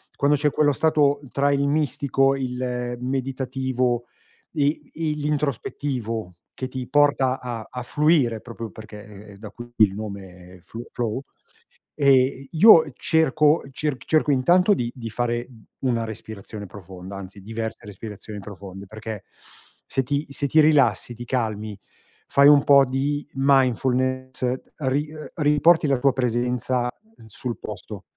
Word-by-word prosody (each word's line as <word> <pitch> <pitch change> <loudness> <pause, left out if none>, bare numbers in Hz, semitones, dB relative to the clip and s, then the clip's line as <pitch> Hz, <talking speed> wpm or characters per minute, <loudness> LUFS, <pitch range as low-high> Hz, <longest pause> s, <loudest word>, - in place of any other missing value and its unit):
quando 145 +1 +3
c'è 150 +1 +2
quello 145 0 +2
stato 145 -1 +2
tra 140 +1 +2
il 140 0 +1
mistico, 140 -2 +1
il 125 -2 -3
meditativo 130 -1 -1 0.5
e 145 -1 +1
i 155 -2 -2
l'introspettivo, 140 - -3 0.2
che 130 - -5
ti 130 -1 -6
porta 140 -3 +3
a 120 -3 -6
a 125 -1 -6
fluire 145 -4 +2
proprio 115 -1 -7
perché 105 -1 -11
è 105 -2 -13
è - - -15
da 105 +1 -9
qui 120 0 -11
il 105 -3 +5
nome, 95 -3 -8
è - - -16
f 115 - -12
flow, 120 +2 -3 0.7
e 135 -1 +3
io 160 -4 +7
cerco 155 +1 +3
cerc 140 -1 -3
cerco 155 -2 +2
intanto 175 +9 +4
di 120 -10 -2
di 115 -3 -7
fare 120 +1 -2 0.3
u 135 - -2
una 115 -2 0
respirazione 105 -1 -8
profonda, 95 0 -10
anzi 100 +1 -9
diverse 110 +2 -5
respirazioni 105 0 -8
profonde, 100 -1 -10
perché 110 0 -7 0.6
se 135 - -1
ti 145 +4 -1
se 140 - -1
ti 155 +4 +3
rilassi, 140 -8 +3
ti 120 +1 -8
calmi, 110 -4 -3 0.5
fai 140 +1 +6
un 145 -1 +6
po' 140 -1 +7
di 140 +3 -2
mindfulness, 130 -1 +1 0.3
ri 145 +1 0 0.3
riporti 150 +1 +4
la 135 -2 +2
tua 140 +2 +4
presenza 125 0 0 0.4
sul 115 +1 -5
posto. - - -8
130 Hz, 140 wpm, -23 LUFS, 110-140 Hz, 0.7 s, io